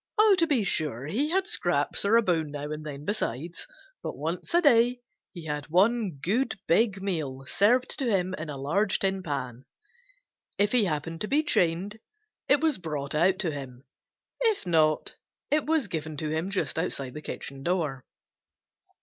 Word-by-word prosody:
To 335 -2 +3
be 270 -8 +2
sure, 150 - -1
he 245 - 0
had 380 +3 +2
scraps 425 - 0
or 220 +3 +5
a 235 - +4
bone 165 -6 0
now 145 0 -5
and 155 0 -5
then 145 -1 -7
besides, 170 - -3 0.3
but - - -5
once - - -3
a - - +7
day 245 -5 +4 0.3
he 170 -4 -9
had 150 -1 -3
one 195 +2 +2
good 220 - 0
big 195 +1 +2
meal 145 -9 -3
served 240 - +2
to 260 -4 0
him 185 -3 +1
in 155 -3 -5
a 145 - -5
large 185 +9 +1
tin 195 -1 0
pan. 135 -7 -4 0.9
If 205 0 +3
he 245 -4 +4
happened 165 0 -3
to 210 - 0
be 295 +5 +2
chained, 190 - 0 0.5
it 285 - +5
was 315 -8 +1
brought 150 -5 -4
out 180 +5 +3
to 170 -5 -1
him. 135 -3 -8 0.6
If 450 - +1
not, 155 -3 +2 0.3
it 300 0 +2
was 315 -7 +2
given 155 -3 -4
to 155 0 -2
him 160 +4 -1
just 190 -4 -1
outside 140 -7 -2
the 150 - -7
kitchen 135 -2 -7
door. 150 -6 -1
175 Hz, 175 wpm, -27 LUFS, 150-225 Hz, 0.9 s, a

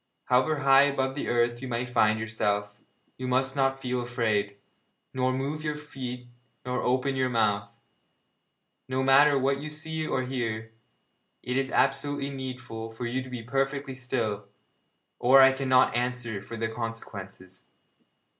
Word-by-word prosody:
However 135 +4 +2
high 135 0 +7
above 135 -2 0
the 145 - -4
earth 120 0 +1
you 130 - -5
may 120 0 -2
find 110 -3 +2
yourself, 105 -2 -1 0.4
you 130 - -3
must 130 +1 +1
not 135 -1 +1
feel 125 -1 -2
afraid, 110 -4 -1 0.6
nor 130 0 +1
move 140 +4 -3
your 150 -1 -2
feet 125 -4 -7 0.4
nor 125 0 -1
open 130 +2 +1
your 130 -1 +1
mouth. 105 -4 +1 1.2
No 130 0 -1
matter 140 +2 +6
what 135 +1 +1
you 150 +2 -5
see 155 +1 -4
or 130 - 0
hear, 115 -4 -3 0.7
it 125 - -2
is 135 0 0
absolutely 140 +1 0
needful 125 -4 -6
for 115 +2 -6
you 125 +2 -1
to 130 - -9
be 125 -2 -6
perfectly 135 +2 -1
still, 115 -6 -2 0.7
or 130 +3 +6
I 135 - +8
cannot 130 -2 +3
answer 120 -4 -2
for 115 +3 -8
the 115 0 -1
consequences.' 100 -5 -7
125 Hz, 150 wpm, -27 LUFS, 115-135 Hz, 1.2 s, I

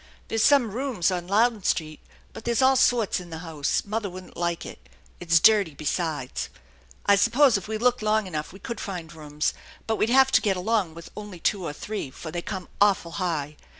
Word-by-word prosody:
There's 225 -1 +1
some 275 -7 +4
rooms 230 -7 0
on 175 -1 -3
Louden 220 +2 +2
Street, 155 -4 -1 0.3
but - - -9
there's 235 +2 +1
all 265 0 +5
sorts 235 -6 +2
in 180 -1 -10
the 160 - -6
house. 150 -4 -1
Mother 210 0 -2
wouldn't 185 0 -11
like 170 -1 -2
it. 65 - -11 0.3
It's 165 0 +4
dirty 200 -6 +4
besides. 150 -3 -3 0.6
I 200 - +6
suppose 235 +5 +4
if 200 -2 -2
we 220 0 -2
look 245 +2 +2
long 215 0 +1
enough 155 -5 -5
we 195 - -12
could 230 +3 -6
find 175 -5 -6
rooms; 150 -1 -2 0.3
but 220 -1 -1
we'd 220 - +1
have 265 +1 +5
to - - +5
get 195 -3 +1
along 190 -4 0
with 170 - -11
only 205 -4 -8
two 190 +3 0
or 155 - -4
three, 205 -2 -5
for 155 +4 -9
they 175 +1 -3
come 190 0 -6
awful 195 -4 +3
high. 150 -4 -2
195 Hz, 205 wpm, -25 LUFS, 165-220 Hz, 0.6 s, I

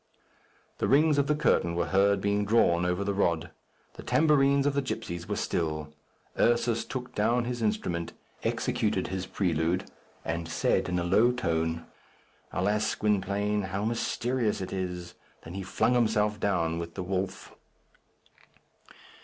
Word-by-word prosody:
The - - +1
rings 150 +2 +4
of 140 - +2
the 150 - +2
curtain 85 - +2
were 85 - +1
heard 100 +1 +3
being 100 0 +1
drawn 90 -5 +3
over 90 +2 0
the 100 0 -1
rod. 85 -5 0 0.5
The - - -7
tambourines 140 -3 +3
of 145 - +2
the 140 - +1
gipsies 85 -10 -5
were - - 0
still. 75 -2 -2 0.5
Ursus 120 -1 +2
took 125 -1 -6
down 120 +3 +1
his 120 -1 -3
instrument, 90 -6 -1 0.3
executed - - 0
his 95 -1 -3
prelude, 85 -2 0 0.3
and 85 0 -2
said 80 - +1
in 90 - 0
a 85 - 0
low 105 +8 +4
tone: 80 -8 -1 0.7
"Alas, 105 +4 0
Gwynplaine, 105 0 0
how 100 +2 -2
mysterious 120 0 -1
it 95 - -5
is!" 90 -2 -4 0.3
then 80 - -9
he 95 - -4
flung 110 +5 +1
himself 110 -3 +2
down 85 -5 0
with 85 0 -6
the 95 - -3
wolf. 95 +1 -3
100 Hz, 145 wpm, -28 LUFS, 85-115 Hz, 0.7 s, rings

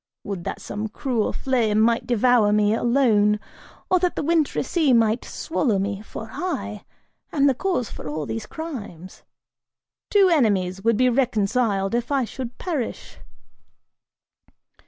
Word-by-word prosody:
Would 195 -4 -5
that - - -4
some 210 +1 -5
cruel 230 0 -1
flame 230 -5 +1
might 230 +1 +2
devour 240 -3 +3
me, 210 0 +3
alone, 225 -4 +3 0.5
or 365 - +3
that 360 0 0
the - - -2
wintry 320 -1 +1
sea 310 -7 +2
might 225 0 +3
swallow 265 -10 -1
me, 200 +1 -2
for 220 +1 -8
I 285 - -4 0.5
am 285 -2 +2
the 275 - +5
cause 305 - -2
for - - -7
all 150 0 -3
these 220 +4 -5
crimes. 210 - -8 0.9
Two 400 -2 +5
enemies 195 - +1
would 230 -1 +3
be 255 +1 +4
reconciled 220 -4 +1
if 240 +3 -1
I 275 -3 +2
should 245 +1 -7
perish!" 310 -10 -4
230 Hz, 140 wpm, -23 LUFS, 210-275 Hz, 0.9 s, the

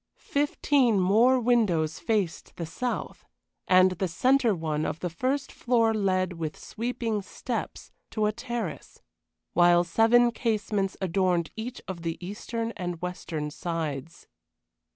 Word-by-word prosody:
Fifteen 280 -5 +2
more 225 +8 +4
windows 200 -10 +2
faced 205 -7 -1
the 170 - -4
south; 245 +10 -4 0.4
and 185 0 +6
the 185 +1 -1
centre 245 +5 +3
one 155 -2 -2
of 160 - -3
the 180 - -3
first 260 - -1
floor 230 -2 +2
led, 185 -3 +1
with 155 -2 -4
sweeping 230 -2 -3
steps, 195 - -5 0.2
to 215 -1 0
a 210 - +2
terrace, 230 - -6 0.5
while 175 0 +5
seven 225 +7 +4
casements 210 -4 -1
adorned 180 -2 +1
each 240 +3 -6
of 185 -3 -5
the 165 0 -3
eastern 230 +4 -4
and 175 -2 -4
western 165 -4 -4
sides. 165 -2 -4
195 Hz, 130 wpm, -27 LUFS, 170-230 Hz, 0.5 s, and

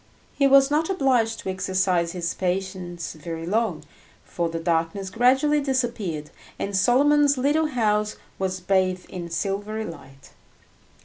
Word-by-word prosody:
He 275 - +3
was 275 0 +6
not 315 +3 +1
obliged 250 -10 +2
to 190 - -5
exercise 185 -2 0
his 170 -2 -2
patience 180 -2 -3
very 165 +1 -6
long, 210 -2 -1 0.4
for 170 -1 -2
the 165 - -4
darkness 165 +3 -1
gradually 265 +7 +3
disappeared, 235 - -2 0.3
and 200 0 -3
Solomon's 285 +7 +4
little 295 +4 +2
house 210 -5 0 0.2
was 185 -1 -2
bathed 185 -1 0
in 175 -2 -6
silvery 205 +5 -3
light. 135 -5 -12
195 Hz, 130 wpm, -24 LUFS, 175-255 Hz, 0.4 s, was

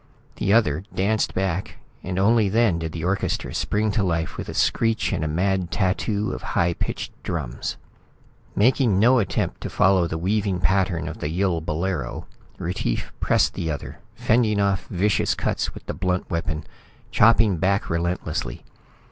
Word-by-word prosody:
The 100 - 0
other 90 -8 +3
danced 105 +3 +1
back, 95 -1 -2 0.2
and 90 0 -4
only 105 +1 +4
then 105 -5 +2
did 80 -1 -4
the 80 -1 -5
orchestra 95 +2 -1
spring 105 +1 0
to 105 +1 0
life 85 -4 -1
with - - -6
a - - -4
screech 115 -1 +1
and - - -1
a - - 0
mad 90 +3 0
tattoo 105 +4 0
of - - -5
high 85 -3 +1
pitched - - -4
drums. 75 -8 -4 0.8
Making 120 -1 +3
no 125 +4 +5
attempt 100 - -1
to - - -4
following 95 -3 +3
the 80 - -3
weaving 95 +1 0
pattern 90 0 +1
of 80 - -6
the 75 - -2
Yill 90 0 0
bolero, 80 -4 -3 0.3
Retief - - -3
pressed - - +2
the 80 - -3
other, 75 -3 -5 0.2
fending 110 -2 +2
off 100 -2 +1
vicious 100 +3 +1
cuts - - -2
with - - -10
the - - -4
blunt 90 0 -2
weapon, 80 -2 -2 0.5
chopping 110 -4 +5
back 100 +4 +1
relentlessly. 85 +2 -2
95 Hz, 160 wpm, -23 LUFS, 85-105 Hz, 0.8 s, no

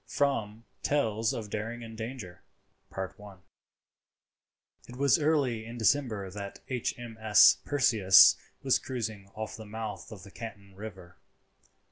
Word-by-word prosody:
* - - -46
*FROM 115 -6 0 0.2
"TALES 115 -6 +1
OF 105 -3 -6
DARING 115 +2 -4
AND 115 -1 -9
DANGER."* 110 -6 -7 2.5
It 125 - -9
was 140 +3 +3
early 140 -7 +1
in 115 +2 -8
December 110 -5 +1
that 100 0 -7
H.M.S. 115 -3 +3
Perseus 110 -9 +6 0.3
was 135 -2 +3
cruising 110 -6 -5
off 110 0 -5
the 110 - -10
mouth 110 -2 -6
of 100 -4 -10
the 100 - -13
Canton 100 -4 -9
River. 95 -3 -10
110 Hz, 120 wpm, -29 LUFS, 105-120 Hz, 2.5 s, Perseus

